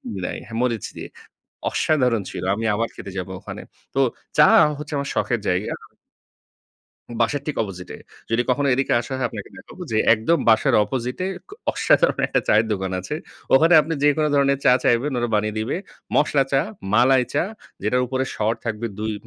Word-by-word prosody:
মিলায়ে। 90 -2 -4
হ্যাঁ, 115 0 -6
মরিচ 120 -4 -1
দিয়ে। - - -6 0.6
অসাধারণ 125 -8 +1
ছিল। - - -6
আমি 115 - -4
আবার 115 +2 0
খেতে 100 - -8
যাব 95 0 -3
ওখানে। - - -8 0.3
তো - - -1 0.4
চা - - +8 0.3
হচ্ছে 150 +1 -7
আমার 140 0 -3
শখের 120 -2 0
জায়গা। 90 +3 0 1.5
বাসার 135 +5 +1
ঠিক 150 - -3
opposite 90 -4 -8
এ। - - -7 0.3
যদি 115 +1 +2
কখনো 140 +2 +1
এদিকে 135 +1 0
আসা 120 - -8
হয় 130 - 0
আপনাকে 105 -4 -8
দেখাবো 185 - -11
যে, - - +1 0.2
একদম 115 +10 +1
বাসার 110 -1 +4
opposite 125 - -4
এ - - -1 0.2
ক - - -18 0.2
অসাধারণ - - +2
একটা - - +1
চায়ের 110 +1 +4
দোকান 95 -1 -3
আছে। 95 +11 -5 0.4
ওখানে 165 +5 +6
আপনি 155 +2 -4
যেকোন 145 +1 +3
ধরনের 140 -1 +3
চা 125 - +6
চাইবেন, 125 +5 +2
ওরা 120 0 -1
বানিয়ে 105 0 0
দিবে। 110 +8 -2 0.4
মশলা 145 -2 +3
চা, 135 - +4 0.3
মালাই 125 +3 +5
চা 145 - +2 0.4
যেটার 125 +5 +1
উপরে 130 +1 -1
স্বর 110 +1 0
থাকবে 115 0 -3
২ 110 +1 -2
120 Hz, 180 wpm, -22 LUFS, 110-140 Hz, 1.5 s, চা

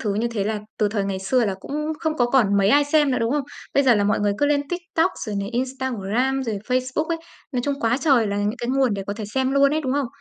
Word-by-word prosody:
thứ 205 -2 -1
như 230 +3 0
thế 210 -4 -2
là 215 -1 -2 0.2
từ 210 - +2
thời 205 -1 -1
ngày 195 -1 -2
xưa 235 +6 +1
là 195 - -1
cũng - - -9 0.3
không 315 -2 -1
có 245 -3 +3
còn 235 -6 +3
mấy 200 0 +3
ai 290 +6 +5
xem 295 -1 +3
nữa, 255 - +1
đúng 230 +1 0
không? 290 -1 +1 0.3
Bây 280 - +5
giờ 255 -4 +5
là 205 - +2
mọi 210 +1 +1
người 205 0 +2
cứ 290 - +3
lên 285 -1 +2
TikTok, 350 0 0 0.2
rồi 210 - -3
này 200 - -4
Instagram, 260 0 -1
rồi 220 -5 -3
Facebook 255 +4 0
ấy. 335 0 -2 0.3
Nói 250 - 0
chung 285 -1 0
quá 230 +2 +2
trời 260 -6 +3
là 200 - -2
những 205 +3 -1
cái 240 - -4
nguồn 260 -4 +2
để 195 - -4
có 200 - -2
thể 215 0 -6
xem 260 +5 -1
luôn 280 0 +4
ấy, 310 - +1
đúng 260 -4 -2
không? 285 -1 0
250 Hz, 290 wpm, -23 LUFS, 210-275 Hz, 0.3 s, ai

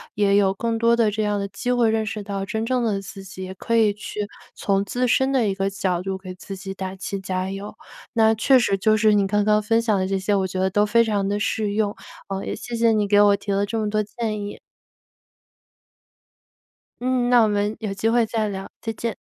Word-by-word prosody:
也 200 -1 +3
有 195 -1 +3
更 230 +3 -2
多 230 +1 +3
的 225 -3 +2
这 215 +1 -1
样 205 -1 0
的 200 - -2
机 245 +6 -3
会 240 -3 +3
认 220 0 0
识 210 0 -4
到 200 -1 -4
真 220 +3 -2
正 250 0 0
的 210 -4 0
自 195 0 -10
己， 190 0 -9
也 185 0 -6
可 230 +4 -2
以 220 -3 +4
去 210 0 -5 0.3
从 195 -1 0
自 245 +5 -1
身 265 +3 +2
的 255 -5 +2
一 195 - 0
个 195 0 -1
角 185 -3 -1
度 190 +1 -3
给 185 -1 -8
自 195 +2 -9
己 195 +1 -6
打 190 0 -5
气 195 +1 -5
加 185 0 -3
油。 200 +2 -7 0.4
那 220 -2 +4
确 240 +5 +4
实 220 -5 +2
就 215 +3 +3
是 215 -1 +4
你 200 -1 +3
刚 205 +1 +1
刚 210 0 +3
分 225 +2 +2
享 220 -3 +1
的 185 - 0
这 195 0 0
些， 200 +2 0
我 190 -1 +1
觉 185 0 -4
得 190 0 +2
都 205 +2 +2
非 230 +2 +4
常 205 -3 0
地 205 +1 -1
适 210 0 -1
用， 210 -1 0 0.3
呃， 195 0 -3
也 - - -3
谢 240 - -6
谢 230 0 +3
你 210 -2 +1
给 205 0 +4
我 205 -1 +6
提 200 0 -5
了 200 +1 +1
这 225 +3 -3
么 215 -1 -1
多 215 0 +1
建 215 0 -4
议。 205 0 -6 2.4
嗯， 250 -1 +1
那 245 -1 +6
我 - - +3
们 205 +1 -1
有 210 -3 -3
机 195 +3 0
会 235 0 +3
再 220 -1 -1
聊， 195 -1 -6
再 225 - -3
见。 230 +1 -3
210 Hz, 260 characters per minute, -23 LUFS, 195-225 Hz, 2.4 s, 我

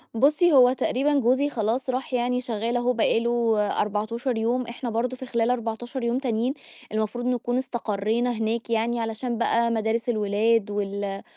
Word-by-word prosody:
بُصّي 300 +8 +4
هو 250 -2 +7
تقريبًا 270 +3 0
جوزي 265 +4 +2
خلاص 240 +2 -1
راح، 255 +1 -3
يعني 250 0 +1
شغّال 235 0 -2
أهو 245 +1 +1
بقى 225 -1 +2
له 235 -1 +1 0.2
14 225 +4 -2
يوم، 235 +2 0
إحنا 240 +1 -5
برضو 235 +3 -1
في 260 - -8
خلال 235 -1 +1
14 240 +2 -3
يوم 235 +2 +1
تانيين 245 0 0 0.4
المفروض 220 +3 -2
نكون 245 0 0
استقرينا 230 -1 -1
هناك 225 +1 -2
يعني 230 +1 0
علشان 225 +2 -3
بقى 235 0 +2
مدارس 225 +1 -1
الولاد 215 0 +1
وال 200 -1 -3
235 Hz, 160 wpm, -25 LUFS, 220-250 Hz, 0.4 s, هو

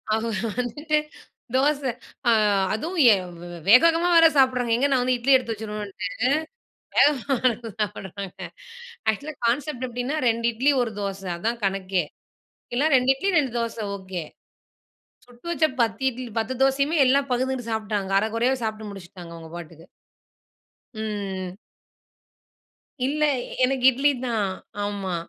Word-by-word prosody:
அவுக 225 +1 -2 0.3
வந்துட்டு 295 +6 -1 0.6
தோச. 285 +2 +2 0.5
ஆ - - +6 0.4
அதுவும் 330 +11 -3
ஏ - - +6 0.3
வே 175 - -8 0.2
வேக, 250 +4 +9
வேகமா 335 +2 +1
வேற 330 0 +8
சாப்புட்றாங்க, 250 -3 +3
எங்க 275 +4 +2
நான் 260 -2 +3
வந்து 255 0 +2
இட்லி 255 +3 +3
எடுத்து 245 -3 +1
வச்சிடுவேன்ட்டு. 210 -3 -5 0.9
வேகமா 280 -2 +3
எடுத்து 230 0 -5
சாப்புடுறாங்க. 200 -2 -5 0.7
ஆக்சுவலா 290 +8 -7
கான்சப்ட் 260 +1 -1
எப்டின்னா, 245 +4 -3
2 230 0 -1
இட்லி, 265 +6 +3
1 235 -2 -1
தோச. 195 -1 -4 0.2
அதான் 230 +6 -2
கணக்கே. 190 -2 0 0.7
இல்ல, 265 - +2
2 255 +1 +4
இட்லி, 340 +9 -1
2 270 -4 -1
தோச 230 0 -3 0.2
ஓக்கே. 185 -3 -6 1.0
சுட்டு 245 +5 -15
வச்ச 330 -2 +2 0.2
10 225 +3 0
இட்லி, 250 0 -7
10 225 +3 -2
தோசையுமே, 275 +4 +2
எல்லாம் 275 +1 +2
பகுந்துகிட்டு 250 -1 -1
சாப்டாங்க, 210 -3 -2
அர 210 - 0
குறையாவே 250 +3 +1
சாப்ட்டு 215 -1 -4
முடிச்சிட்டாங்க, 180 -3 -11
அவங்க 165 -1 -11
பாட்டுக்கு. 165 -1 -11 1.1
ம். 195 -4 -4 1.5
இல்ல, 300 +2 0 0.4
எனக்கு 255 0 +1
இட்லிதான். 245 -6 0 0.3
ஆமா. 200 -3 -3
235 Hz, 130 wpm, -24 LUFS, 205-265 Hz, 1.5 s, வேக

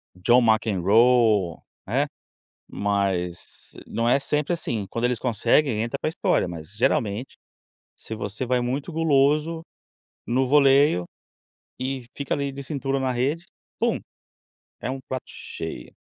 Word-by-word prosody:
John 120 +7 +4
McEnroe, 110 -2 +3 0.3
né, - - +1 0.6
mas 95 -4 -2
não 115 +1 -1
é 130 - +5
sempre 150 +4 0
assim, 115 - -2
quando 115 +1 -2
eles 125 -2 +1
conseguem 120 0 +2
entra 120 +4 -3
para - - 0
história, 125 - +1
mas 85 +3 -8
geralmente, 120 -2 0 0.6
se 110 - -7
você 105 +4 -4
vai 125 0 +2
muito 135 +7 -3
guloso, 155 +1 +2 0.7
no 130 +2 +2
voleio, 140 - +5 0.7
e 130 -1 -3
fica 140 - -2
ali 140 -1 -2
de 140 +1 -7
cintura 135 -1 -2
na 130 -1 0
rede, 140 +8 -1 0.3
pum, - - +2 0.8
é 125 - -3
um 135 0 -4
prato 130 -1 -4
cheio. - - -7
125 Hz, 130 wpm, -24 LUFS, 105-140 Hz, 0.8 s, é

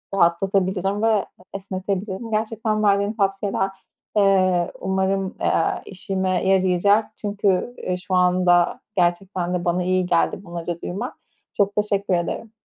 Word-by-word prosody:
rahatlatabilirim 190 +2 +1
ve 220 -3 +3 0.3
esnetebilirim. 195 +2 -4
Gerçekten 215 0 -1
verdiğin 200 0 +2
tavsiyeler, 195 -2 0 0.5
eee, 185 -3 +3
umarım, 190 0 0
eee, 165 - +1
işime 190 -1 -2
yarayacak. 190 +3 +3 0.2
Çünkü, 205 +2 0
eee, 180 0 -2
şu 185 +1 -3
anda 180 -1 +3 0.2
gerçekten 180 0 0
de 180 -1 -2
bana 175 +1 +1
iyi 185 0 +1
geldi 175 +2 +1
bunları 170 -1 -5
duymak. 185 +3 -4 0.4
Çok 200 0 +2
teşekkür 205 -2 0
ederim. 175 +5 -2
190 Hz, 120 wpm, -22 LUFS, 180-200 Hz, 0.5 s, ve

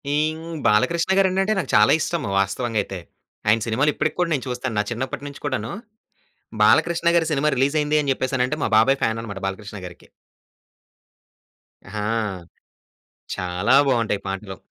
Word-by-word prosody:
ఈ - - +2 0.2
హ్మ్ 165 +1 -8
'బాలకృష్ణ' 165 - +2
గారు 195 -1 +5
ఏంటంటే, 195 +3 +1
నాకు 185 - -4
చాలా - - +6
ఇష్టము 170 -11 -2
వాస్తవంగా 110 +4 -1
అయితే. 95 -2 -7 0.5
ఆయన 110 +2 +4
సినిమాలు 130 +7 +2
ఇప్పటికి 155 0 -1
కూడా 175 -1 +1
నేను 135 - -2
చూస్తాను. 125 -1 -3
నా - - +2
చిన్నప్పటినుంచి 130 +4 -5
కూడాను 130 -5 -2 0.9
'బాలకృష్ణ' 170 +10 +3
గారి 165 -1 +1
సినిమా 150 +1 +2
రిలీజ్ 135 +4 +1
అయింది 150 +1 +1
అని 140 - 0
చెప్పేసానంటే, 130 +2 -1
మా - - 0
బాబాయ్ 135 +5 +4
ఫ్యాన్ 110 0 0
అన్నమాట 100 -4 -7
'బాలకృష్ణ' 100 0 -7
గారికి. 90 - -15 1.9
హా! 105 - -3 1.3
చాలా 90 +6 0
బాగుంటాయి 115 -6 +1
పాటలు. 95 0 -5
125 Hz, 145 wpm, -22 LUFS, 105-150 Hz, 1.9 s, చాలా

